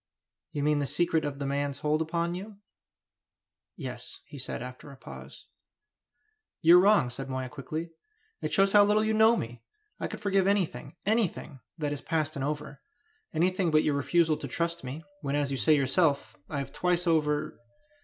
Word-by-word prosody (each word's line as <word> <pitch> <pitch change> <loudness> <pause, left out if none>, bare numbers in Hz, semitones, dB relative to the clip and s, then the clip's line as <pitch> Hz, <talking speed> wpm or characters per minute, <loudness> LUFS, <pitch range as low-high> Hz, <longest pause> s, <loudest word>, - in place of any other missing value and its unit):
"You 145 - -2
mean 150 0 +2
the 140 - -1
secret 165 0 +1
of 145 -1 -3
the 140 - -4
man's 140 0 -2
hold 155 +1 +1
upon 170 +2 -1
you?" 200 +3 -7 1.2
"Yes," - - -7
he 145 - -10
said, 125 - -3
after 125 +3 -9
a 135 - -13
pause. - - -11 1.1
"You 170 +2 +7
are - - +5
wrong," 195 -11 +4
said 135 +2 -6
Moya, 130 -1 -3
quickly. 155 +4 -5 0.5
"It - - -2
shows 195 -1 +3
how 205 -1 +8
little 210 +1 +3
you 220 0 +1
know 220 +2 +5
me! 120 - -5 0.4
I - - -2
could - - -7
forgive 195 -2 +2
anything 195 -4 0
anything 200 - 0 0.2
that 150 -3 -1
is 145 - -5
past 155 -2 -1
and 135 - -3
over. 150 0 -4 0.5
Anything 180 +2 +1
but 155 -1 +4
your 150 - +1
refusal 155 +2 +2
to - - -6
trust 170 0 -2
me... 135 +5 -6 0.2
when 140 -1 -2
as 145 -1 0
you 135 - -1
say 155 +3 +4
yourself... 140 +1 +1
I 145 - -3
have 140 -1 -4
twice 180 +2 0
over...." 155 -3 +1
155 Hz, 185 wpm, -29 LUFS, 140-180 Hz, 1.2 s, how